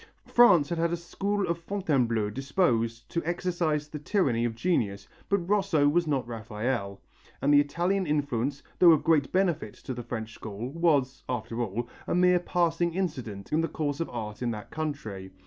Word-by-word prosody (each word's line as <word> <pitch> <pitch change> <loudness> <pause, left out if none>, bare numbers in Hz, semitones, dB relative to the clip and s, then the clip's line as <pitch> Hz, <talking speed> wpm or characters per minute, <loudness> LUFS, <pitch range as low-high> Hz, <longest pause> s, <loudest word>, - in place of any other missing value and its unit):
France 180 -12 +5
had 170 - -2
had 170 0 +1
a 170 - 0
"school 195 +4 -2
of 170 0 -1
Fontainebleau" 135 - 0
disposed 115 - 0
to 170 - -2
exercise 170 -3 -1
the 150 0 -7
tyranny 140 - +1
of 115 -1 -2
genius, 105 - 0 0.2
but 200 -4 +1
Rosso 185 -8 +3
was 170 +3 +2
not 135 -5 0
Raphael, 110 -2 -3 0.4
and 145 +1 +3
the 145 - +8
Italian 175 +6 0
influence, 140 -2 -1 0.2
though 175 -2 +8
of 155 - +1
great 155 -4 +3
benefit 175 - 0
to 130 - -6
the 120 - -5
French 115 -1 -5
school, 110 +5 -6
was, 145 -5 +1
after 115 -1 -3
all, 115 +2 -2 0.2
a - - 0
mere 180 0 +5
passing 170 -1 0
incident 125 - -4
in 160 - +3
the 165 - 0
course 145 -3 -3
of 165 - -2
art 110 -2 -6
in 120 - 0
that 105 -2 -6
country. 110 -12 -4
145 Hz, 180 wpm, -28 LUFS, 115-170 Hz, 0.4 s, the